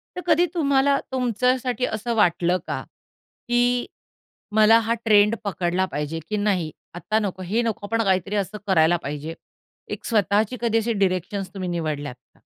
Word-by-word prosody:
तर 360 Hz, -, -4 dB
कधी 335 Hz, +1 st, +4 dB
तुम्हाला 280 Hz, -4 st, +2 dB
तुमच्यासाठी 250 Hz, 0 st, 0 dB
असं 225 Hz, +2 st, -3 dB
वाटलं 180 Hz, -3 st, +2 dB
का, -, -, -3 dB, 0.6 s
की 245 Hz, 0 st, +2 dB, 0.7 s
मला 220 Hz, +1 st, +6 dB
हा 230 Hz, +1 st, 0 dB
ट्रेंड 210 Hz, 0 st, +5 dB
पकडला 185 Hz, -2 st, 0 dB
पाहिजे, 150 Hz, +2 st, -3 dB
की 215 Hz, -, -1 dB
नाही 190 Hz, -6 st, 0 dB, 0.2 s
आता 215 Hz, +5 st, 0 dB
नको 190 Hz, -3 st, -3 dB
हे 210 Hz, +7 st, 0 dB
नको 215 Hz, -3 st, -3 dB
पण 230 Hz, +1 st, 0 dB
काहीतरी 190 Hz, 0 st, 0 dB
असं 200 Hz, +1 st, -2 dB
करायला 170 Hz, -2 st, +4 dB
पाहिजे. 150 Hz, +3 st, -5 dB, 0.6 s
एक -, -, -6 dB
स्वतःची 215 Hz, +2 st, +1 dB
कधी 230 Hz, -1 st, +2 dB
अशी 225 Hz, +1 st, 0 dB
डीरेक्शन्स 190 Hz, 0 st, -1 dB
तुम्ही 185 Hz, -2 st, -4 dB
निवडल्यात 155 Hz, -6 st, -3 dB
का? 125 Hz, -, -34 dB
210 Hz, 155 wpm, -23 LUFS, 180-235 Hz, 0.7 s, मला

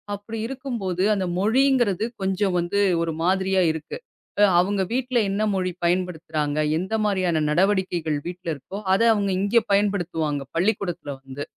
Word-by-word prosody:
அப்படி 210 Hz, +3 st, -8 dB
இருக்கும்போது, 235 Hz, -9 st, -3 dB
அந்த 190 Hz, -2 st, -1 dB
மொழிங்கிறது 230 Hz, -2 st, +2 dB, 0.2 s
கொஞ்சம் 190 Hz, 0 st, 0 dB
வந்து 175 Hz, +4 st, -1 dB, 0.2 s
ஒரு 165 Hz, -1 st, -1 dB
மாதிரியா 190 Hz, +1 st, +2 dB
இருக்கு. 155 Hz, -, -6 dB, 0.4 s
அ -, -, +7 dB, 0.2 s
அவுங்க 195 Hz, +2 st, +1 dB
வீட்டுல 255 Hz, -1 st, +1 dB
என்ன 200 Hz, -, -1 dB
மொழி 185 Hz, -1 st, -1 dB
பயன்படுத்துறாங்க? 160 Hz, -4 st, -1 dB, 0.2 s
எந்த 190 Hz, +4 st, -4 dB
மாதிரியான 180 Hz, -6 st, +1 dB
நடவடிக்கைகள் 175 Hz, -3 st, +1 dB
வீட்டுல 180 Hz, -1 st, -6 dB
இருக்கோ, 190 Hz, +9 st, -8 dB, 0.2 s
அதை 230 Hz, +4 st, +3 dB
அவங்க 200 Hz, -1 st, 0 dB
இங்க 220 Hz, +3 st, +3 dB
பயன்படுத்துவாங்க, 175 Hz, -8 st, 0 dB, 0.2 s
பள்ளிக்கூடத்துல 180 Hz, -5 st, -1 dB
வந்து. 135 Hz, +2 st, -7 dB
190 Hz, 135 wpm, -23 LUFS, 170-205 Hz, 0.4 s, அ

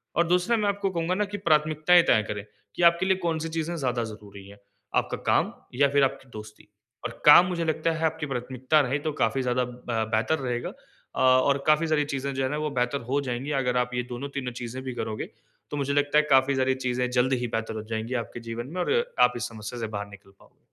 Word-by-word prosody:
और 170 Hz, +1 st, +2 dB
दूसरा 180 Hz, +7 st, +2 dB
मैं 210 Hz, -2 st, 0 dB
आपको 200 Hz, 0 st, -1 dB
कहूँगा 170 Hz, +1 st, -1 dB
ना 210 Hz, +2 st, 0 dB
की 205 Hz, -, -3 dB
प्राथमिकताएँ 155 Hz, 0 st, +4 dB
तय 110 Hz, -, +3 dB
करें 105 Hz, -1 st, -4 dB, 0.3 s
कि -, -, -3 dB
आपके 170 Hz, +2 st, +5 dB
लिए 190 Hz, 0 st, +3 dB
कौन-सी 165 Hz, -3 st, -2 dB
चीज़ें 165 Hz, +1 st, -3 dB
ज़्यादा 125 Hz, -5 st, -1 dB
ज़रूरी 105 Hz, -3 st, -10 dB
है। 100 Hz, 0 st, -14 dB, 0.4 s
आपका -, -, 0 dB
काम -, -, +2 dB, 0.3 s
या 140 Hz, -, +6 dB
फ़िर 140 Hz, 0 st, +3 dB
आपकी 135 Hz, 0 st, -2 dB
दोस्ती। 105 Hz, -1 st, -11 dB, 0.4 s
और -, -, -6 dB
काम 150 Hz, +4 st, +9 dB
मुझे 170 Hz, -2 st, -2 dB
लगता 160 Hz, +1 st, 0 dB
है 165 Hz, 0 st, -1 dB
आपकी 160 Hz, -1 st, -1 dB
प्राथमिकता 130 Hz, +2 st, 0 dB
रहे 140 Hz, +1 st, -1 dB
तो -, -, +1 dB
काफ़ी 115 Hz, +4 st, +1 dB
ज़्यादा 125 Hz, 0 st, 0 dB
अ, 120 Hz, -2 st, -3 dB
बेहतर 155 Hz, +8 st, +1 dB
रहेगा। 120 Hz, -3 st, -3 dB
अ, -, -, -10 dB
और 130 Hz, +2 st, +4 dB
काफ़ी 155 Hz, +2 st, +4 dB
सारी 150 Hz, -2 st, +1 dB
चीज़ें 140 Hz, -1 st, -3 dB
जो 135 Hz, -, -1 dB
है 130 Hz, -, 0 dB
ना 150 Hz, -, -2 dB
वो 150 Hz, 0 st, -2 dB
बेहतर 125 Hz, +3 st, 0 dB
हो 140 Hz, +1 st, +2 dB
जाएँगी, 130 Hz, +2 st, -4 dB
अगर 125 Hz, -1 st, 0 dB
आप 125 Hz, 0 st, 0 dB
ये 125 Hz, 0 st, -1 dB
दोनों 135 Hz, +4 st, -5 dB
तीनों 125 Hz, -2 st, -4 dB
चीज़ें 120 Hz, +2 st, -5 dB
भी 130 Hz, -1 st, -5 dB
करोगे, 110 Hz, -2 st, -4 dB, 0.4 s
तो 145 Hz, -, -3 dB
मुझे 140 Hz, 0 st, -1 dB
लगता 145 Hz, +1 st, +2 dB
है 150 Hz, -, +5 dB
काफ़ी 135 Hz, +1 st, +4 dB
सारी 130 Hz, 0 st, +1 dB
चीज़ें 125 Hz, -1 st, -1 dB
जल्द 125 Hz, +1 st, +2 dB
ही -, -, -1 dB
बेहतर 110 Hz, -1 st, -3 dB
हो 110 Hz, -, -5 dB
जाएँगी 110 Hz, +3 st, -3 dB
आपके 120 Hz, -, -10 dB
जीवन 115 Hz, +2 st, -5 dB
में 180 Hz, -, -1 dB
और -, -, +1 dB, 0.3 s
आप 125 Hz, 0 st, +5 dB
इस 125 Hz, -, -3 dB
समस्या 115 Hz, +1 st, -7 dB
से 115 Hz, -, -2 dB
बाहर 100 Hz, 0 st, -5 dB
निकल 100 Hz, -1 st, -15 dB
पाओगे। -, -, -23 dB
130 Hz, 235 wpm, -26 LUFS, 120-155 Hz, 0.4 s, काम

